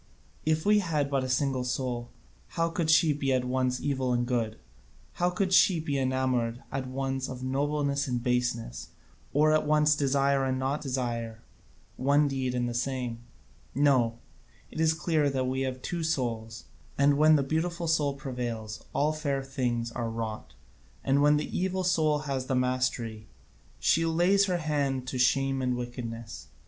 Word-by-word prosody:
If 155 0 +1
we 210 0 +5
had 150 -7 -1
but 135 -1 +1
a 130 - -3
single 130 -1 0
soul, 125 -1 -3 0.5
how 165 0 +2
could 165 -1 -1
she 160 -1 +5
be 140 -1 -1
at 130 -1 +1
once 125 0 0
evil 130 -3 -1
and 120 0 +1
good? 115 -3 -1 0.6
How 175 - +4
could 185 +1 -1
she 185 -2 +5
be 145 -3 -2
enamoured 130 -2 0
at 130 -1 -3
once 135 0 -3
of 130 0 -7
nobleness 140 +1 0
and 120 -2 -2
baseness, 120 - -1 0.4
or 155 +2 +4
at 155 -1 +2
once 150 0 +4
desire 140 -1 +2
and 130 -1 0
not 135 +3 -1
desire 120 -4 -3 0.5
one 145 +3 +3
deed 130 -2 -2
and 120 0 0
the 120 - -3
same? 125 -1 -2 0.6
No, 130 -5 +3 0.5
it - - -7
is 160 0 +3
clear 155 -2 +1
that 130 -2 -1
we 130 +1 -1
have 130 -1 -3
two 175 -1 -3
souls, 115 -8 -2 0.3
and 140 +1 +4
when 155 +2 +6
the 140 - +2
beautiful 170 +4 -2
soul 150 -3 +1
prevails, 120 -5 -5
all 150 +2 +1
fair 140 -3 -2
things 120 -4 -2
are 115 -1 -3
wrought, 110 - -5 0.5
and 135 +1 +2
when 150 +1 +5
the 150 - -4
evil 185 +1 0
soul 155 -4 +2
has 135 -3 -3
the 130 - 0
mastery, 125 -4 -1 0.5
she 165 - +2
lays 175 +5 +3
her 180 -2 +1
hand 140 -5 -1
to 130 - -4
shame 135 +1 +2
and 125 -1 0
wickedness. 115 -3 -6
135 Hz, 170 wpm, -28 LUFS, 125-150 Hz, 0.6 s, when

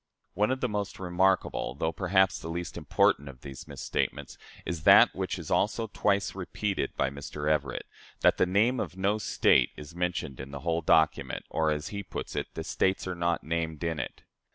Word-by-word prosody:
One 105 +2 +2
of 130 +1 -1
the 125 - +2
most 105 -3 -3
remarkable 95 -6 +1
though, 80 +3 -1
perhaps, 95 +1 +2
the 80 - -7
least 85 +1 -4
important 70 0 +2
of 65 -2 -13
these 70 -2 -9
misstatements - - -3 0.3
is 85 -3 -3
that - - +7
which - - -3
is - - -7
also 110 +1 +1
twice 100 -1 +1
repeated 95 +2 -3
by 65 0 +1
Mr. 70 +1 -6
Everett 75 -3 0 0.4
that - - +4
the - - +3
name 110 +7 +2
of 95 - -4
no 100 +3 +1
State 65 - +3
is 75 +2 -9
mentioned 90 -6 -2
in 65 +1 -7
the 70 -1 -7
whole 85 +1 0
document, 80 -1 +2
or, 80 -1 +1
as 75 0 -2
he 100 -1 -4
puts 95 - -6
it, - - -2
"the - - -4
States 95 0 0
are 90 - -2
not 85 -1 -1
named 80 -1 -2
in 80 -2 -1
it." - - -6
85 Hz, 195 wpm, -29 LUFS, 75-95 Hz, 0.4 s, that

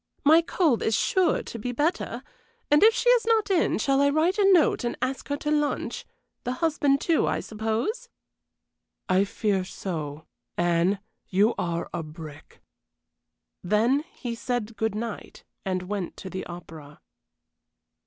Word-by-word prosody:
"My 315 +3 +7
cold 330 - +1
is 220 - +1
sure 365 - +2
to 230 - -7
be 245 +4 -3
better; 295 +8 -1 0.5
and 295 - +6
if 440 - +8
she 485 - -2
is - - +4
not 445 -3 +2
in, 355 -3 +2
shall 275 +4 +2
I 280 - +4
write 325 +7 +1
a 395 -1 +5
note 340 -7 +4
and 240 - -2
ask 260 +1 -3
her 285 - -1
to 300 +1 -3
lunch? 295 -1 -1 0.4
The 250 - -2
husband, 285 -1 +1
too, 330 +1 +2
I - - 0
suppose?" 220 - -3 1.0
"I 185 +2 +3
fear 200 -2 0
so. 160 -5 -5 0.3
Anne, 175 +3 +2 0.3
you 205 +5 +3
are 170 -1 -2
a - - -2
brick." 155 -1 -11 1.0
Then 230 +10 +2
he 250 - -5
said 230 -2 -3
good 220 -2 -1
night, 225 0 -6 0.2
and 185 -1 -1
went 195 -1 -4
to 190 - -8
the 190 - -5
opera. 160 -4 -10
230 Hz, 155 wpm, -26 LUFS, 185-300 Hz, 1.0 s, if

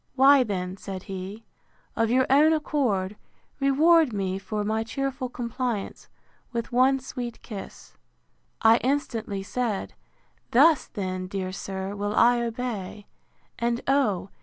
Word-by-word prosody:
Why 275 +1 +7
then, 185 -4 -3
said 190 -2 -7
he, 195 +3 -7 0.5
of 225 0 +1
your 255 +2 +3
own 300 +4 +5
accord, 230 -11 0 0.4
reward 305 +2 +4
me 190 -2 -2
for 210 +1 -3
my 220 +2 0
cheerful 265 +2 -3
compliance, 240 -3 -4 0.4
with 235 -1 -4
one 260 +2 +4
sweet 245 -2 -7
kiss—I 225 +1 -2
instantly 230 -7 -2
said, 225 -2 -2 0.6
Thus, 295 +5 +5
then, 185 -3 -4
dear 185 -1 -4
sir, 190 +1 -5
will 205 +1 -2
I 240 +1 +5
obey; 225 -4 -4 0.5
and, 235 0 0
oh! 230 -9 +1
230 Hz, 120 wpm, -26 LUFS, 195-260 Hz, 0.6 s, Why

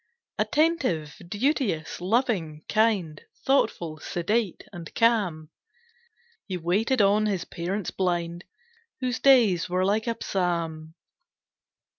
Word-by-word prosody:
Attentive, 275 - +1
duteous, 205 - -1
loving, 185 - 0
kind, 210 -9 +1 0.2
Thoughtful, 175 - +1
sedate, 195 +5 -1
and 170 -2 -8
calm, 190 -9 +1 1.0
He 185 -3 -3
waited 205 +8 +1
on 210 +2 +3
his 190 -4 -1
parents 185 +3 -4
blind, 175 -2 -2 0.6
Whose 255 -2 -2
days 225 -11 +4
were 185 +1 +1
like 215 +4 +1
a 230 - -1
psalm. 165 -4 -2
190 Hz, 100 wpm, -26 LUFS, 170-230 Hz, 1.0 s, days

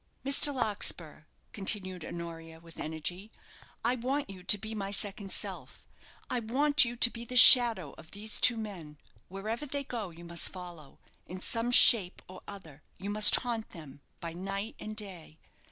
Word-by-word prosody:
"Mr. 280 +1 +3
Larkspur," 200 - -3 0.3
continued 190 -3 -2
Honoria, 165 -1 -10
with 165 -1 -17
energy. 175 +7 -7 0.5
"I 240 - +2
want 260 0 -4
you 185 -2 -13
to 190 +3 +2
be 220 +2 -8
my 200 -2 -6
second 200 0 -2
self. - - -4 0.4
I 250 - -3
want 285 +6 +1
you 240 -1 -5
to 235 0 +3
be 235 - -9
the 250 +2 -9
shadow 235 - +8
of 160 - -15
these 210 +2 -4
two 235 - +3
men. 180 -9 -9 0.3
Wherever 220 +9 -6
they 280 +1 -5
go, 230 -7 -7
you 170 +1 -14
must 170 0 -1
follow 175 -6 -13 0.3
in 185 +1 -9
some 230 +5 -1
shape 225 -6 +6
or 185 - -13
other 160 -8 -12 0.2
you 200 +2 -7
must 210 0 +4
haunt 235 -3 -5
them, 145 -4 -13 0.2
by 170 -1 -7
night 195 +5 -6
and 215 0 -8
day. 185 -7 -11
200 Hz, 170 wpm, -29 LUFS, 170-230 Hz, 0.5 s, shadow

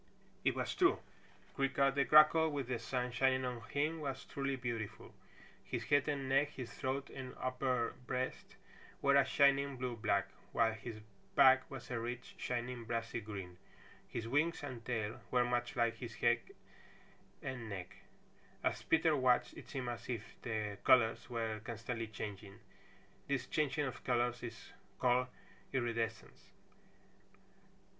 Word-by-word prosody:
It - - +2
was - - -1
true. 370 0 +4 0.6
Creaker 135 0 +2
the 140 0 +2
Grackle 155 +2 +7
with 140 -4 -3
the 125 -2 -1
sun 125 +2 -2
shining 130 +1 +2
on 125 -2 -3
him 155 +3 0
was 135 -3 -4
truly 140 -1 -2
beautiful. 120 -4 -5 0.5
His - - -3
head 145 0 +3
and 140 -3 -1
neck, 140 +2 +3
his 125 -3 -6
throat 135 +1 -3
and 130 -1 -7
upper 130 -2 0
breast, 130 +10 -3 0.5
were 140 0 +5
a 140 - +7
shining 140 -1 +3
blue 125 -1 -2
black, 100 -3 +1 0.3
while 115 -1 +3
his 110 -1 -7 0.3
back 130 0 +7
was 135 -2 -8
a 120 - -1
rich, 120 +2 -5
shining 120 0 -3
brassy 115 0 -2
green. 95 -4 -7 0.5
His 115 - -4
wings 150 +6 +1
and 130 -5 -6
tail 110 -2 -2
were 125 -1 +3
much 120 0 -1
like 115 -1 +1
his 115 -2 -7
head 120 0 +3 1.0
and 125 -4 -4
neck. 95 -3 -6 0.7
As - - 0
Peter 160 -1 +3
watched 130 -3 +3
it - - -11
seemed 130 -3 -3
as 120 -1 -6
if 115 -4 -2 0.2
the 105 -3 -3
colors 120 0 +4
were 115 -2 -2
constantly 115 0 -4
changing. 100 -2 -7 0.7
This 135 -3 0
changing 150 +1 0
of 130 - -5
colors 120 -1 +1
is 115 -3 -8 0.3
called 125 0 +3 0.4
iridescence. 115 -4 -2
125 Hz, 145 wpm, -36 LUFS, 115-135 Hz, 1.0 s, Grackle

